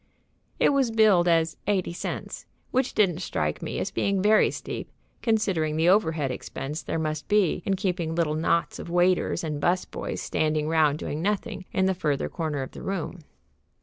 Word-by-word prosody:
It -, -, +5 dB
was 275 Hz, -4 st, +2 dB
billed 215 Hz, -6 st, +4 dB
as 165 Hz, -1 st, +2 dB
"90 190 Hz, -4 st, 0 dB
(.80)," -, -, -5 dB, 0.3 s
which 260 Hz, 0 st, 0 dB
didn't 180 Hz, -6 st, +3 dB
strike 75 Hz, -, -2 dB
me -, -, -4 dB
as -, -, -2 dB
being 200 Hz, -1 st, 0 dB
very 210 Hz, +3 st, +5 dB
steep, -, -, -6 dB, 0.3 s
considering 195 Hz, -9 st, +1 dB
the 165 Hz, +2 st, +4 dB
overhead 160 Hz, -8 st, +2 dB
expense 145 Hz, +4 st, -5 dB
there -, -, -3 dB
must 155 Hz, -1 st, -3 dB
be 205 Hz, -5 st, +2 dB
in 195 Hz, -, +2 dB
keeping 180 Hz, -4 st, -2 dB
little 165 Hz, -3 st, +1 dB
knots 165 Hz, +2 st, 0 dB
of -, -, -7 dB
waiters 175 Hz, 0 st, +2 dB
and 150 Hz, -2 st, -3 dB
'bus 180 Hz, +1 st, +2 dB
boys -, -, -5 dB
standing 155 Hz, -1 st, 0 dB
round 155 Hz, -2 st, +3 dB
doing 155 Hz, 0 st, -4 dB
nothing 205 Hz, 0 st, -2 dB
in 190 Hz, -, +1 dB
the 190 Hz, -, +2 dB
further 150 Hz, -6 st, -1 dB
corner 155 Hz, -5 st, -2 dB
of 130 Hz, -, -8 dB
the -, -, -10 dB
room. 185 Hz, -2 st, -4 dB
175 Hz, 180 wpm, -26 LUFS, 155-195 Hz, 0.3 s, It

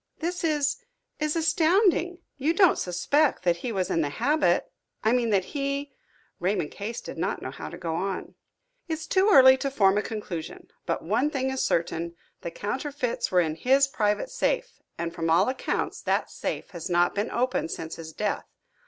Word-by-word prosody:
"This 345 Hz, +2 st, -3 dB
is 295 Hz, -2 st, +1 dB, 0.4 s
is 305 Hz, 0 st, 0 dB
astounding! 350 Hz, +2 st, +2 dB
You 300 Hz, +5 st, 0 dB
don't 370 Hz, -2 st, +5 dB
suspect 275 Hz, -, +1 dB
that 175 Hz, -1 st, +2 dB
he 235 Hz, +7 st, -4 dB
was 190 Hz, -4 st, -1 dB
in 165 Hz, -, +2 dB
the 145 Hz, -, 0 dB
habit 280 Hz, -, +1 dB, 0.3 s
I 220 Hz, -, +3 dB
mean 240 Hz, -2 st, +2 dB
that 195 Hz, -3 st, +2 dB
he 280 Hz, 0 st, -2 dB, 0.2 s
" -, -, -36 dB
Raymond 180 Hz, -4 st, 0 dB
Case 215 Hz, +3 st, -5 dB
did -, -, -8 dB
not -, -, -1 dB
know -, -, -4 dB
how -, -, -7 dB
to -, -, -9 dB
go 165 Hz, -1 st, -3 dB
on. 190 Hz, +2 st, -3 dB, 0.5 s
"It's 320 Hz, -1 st, -3 dB
too 380 Hz, +5 st, +3 dB
early 260 Hz, -5 st, +8 dB
to 275 Hz, +1 st, -2 dB
form 205 Hz, -6 st, +3 dB
a -, -, 0 dB
conclusion. 200 Hz, -7 st, -6 dB, 0.2 s
But -, -, -1 dB
one 225 Hz, -, +1 dB
thing 265 Hz, -3 st, -1 dB
is 265 Hz, -, -2 dB
certain, 170 Hz, 0 st, -1 dB, 0.3 s
the -, -, -4 dB
counterfeits 255 Hz, -, -3 dB
were 180 Hz, -1 st, +4 dB
in 160 Hz, -2 st, -1 dB
his 265 Hz, -, +3 dB
private 210 Hz, -, 0 dB
safe, -, -, -1 dB, 0.2 s
and 170 Hz, 0 st, -3 dB
from 165 Hz, -1 st, -2 dB
all 165 Hz, -, +4 dB
accounts 260 Hz, -, -2 dB
that -, -, 0 dB
safe -, -, -4 dB
had 170 Hz, 0 st, -6 dB
not 175 Hz, 0 st, +3 dB
been 205 Hz, +2 st, -1 dB
opened 250 Hz, -8 st, 0 dB
since 160 Hz, -1 st, -5 dB
his 160 Hz, -1 st, -8 dB
death. -, -, -2 dB
245 Hz, 190 wpm, -26 LUFS, 175-300 Hz, 0.5 s, early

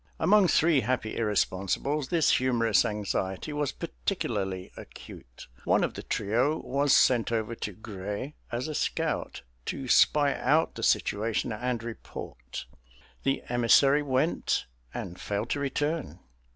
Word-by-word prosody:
Among 205 Hz, -1 st, +5 dB
three 160 Hz, -3 st, +4 dB
happy 125 Hz, -4 st, -2 dB
irresponsibles 105 Hz, +6 st, 0 dB
this 165 Hz, -3 st, +3 dB
humorous 115 Hz, -4 st, +2 dB
anxiety 105 Hz, +4 st, -2 dB
was 145 Hz, -1 st, -1 dB
particularly 100 Hz, -, -3 dB
acute. -, -, -12 dB, 0.2 s
One -, -, +3 dB
of -, -, -1 dB
the -, -, -6 dB
trio 120 Hz, +9 st, 0 dB
was 140 Hz, 0 st, 0 dB
sent 120 Hz, -3 st, +4 dB
over 115 Hz, 0 st, -1 dB
to 105 Hz, -, -4 dB
Grez 105 Hz, +5 st, -6 dB, 0.2 s
as 120 Hz, +4 st, -2 dB
a 155 Hz, -, -4 dB
scout, -, -, -2 dB, 0.2 s
to 135 Hz, -1 st, -4 dB
spy 145 Hz, +3 st, +4 dB
out 150 Hz, +5 st, +2 dB
the -, -, -7 dB
situation 110 Hz, +3 st, +1 dB
and 120 Hz, +1 st, -2 dB
report. 65 Hz, -, -8 dB, 0.6 s
The 135 Hz, 0 st, 0 dB
emissary 125 Hz, +4 st, +4 dB
went, 140 Hz, +3 st, 0 dB, 0.3 s
and 90 Hz, -, -6 dB
failed 105 Hz, +3 st, -3 dB
to 145 Hz, -, 0 dB
return. 140 Hz, -, -2 dB
120 Hz, 130 wpm, -28 LUFS, 105-145 Hz, 0.6 s, Among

